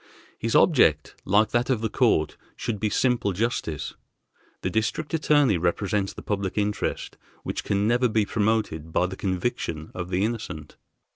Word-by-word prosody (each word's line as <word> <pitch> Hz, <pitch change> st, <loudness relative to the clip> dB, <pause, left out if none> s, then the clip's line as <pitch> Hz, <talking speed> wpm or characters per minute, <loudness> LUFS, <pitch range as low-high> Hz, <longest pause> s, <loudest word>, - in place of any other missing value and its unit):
His 115 Hz, 0 st, -1 dB
object, 80 Hz, -, +4 dB
like 105 Hz, +3 st, +3 dB
that 120 Hz, +1 st, +1 dB
of 125 Hz, -5 st, +1 dB
the 115 Hz, -, +1 dB
court, 110 Hz, -, +2 dB, 0.2 s
should 110 Hz, -3 st, -3 dB
be 110 Hz, -, 0 dB
simple 120 Hz, -4 st, +1 dB
justice. 95 Hz, -, -2 dB, 0.7 s
The -, -, -1 dB
District 110 Hz, +9 st, -1 dB
Attorney 145 Hz, -, +3 dB
represents 95 Hz, +3 st, 0 dB
the -, -, -10 dB
public 100 Hz, -2 st, -2 dB
interest 105 Hz, 0 st, -2 dB, 0.3 s
which -, -, -3 dB
can 100 Hz, +1 st, +1 dB
never 120 Hz, +1 st, +3 dB
be 110 Hz, -1 st, +2 dB
promoted 105 Hz, -8 st, -1 dB
by 90 Hz, -, +2 dB
the 95 Hz, +1 st, -5 dB
conviction 90 Hz, -5 st, -3 dB
of 90 Hz, -1 st, -5 dB
the 95 Hz, +2 st, +1 dB
innocent. 105 Hz, -10 st, -5 dB
105 Hz, 155 wpm, -25 LUFS, 90-115 Hz, 0.7 s, object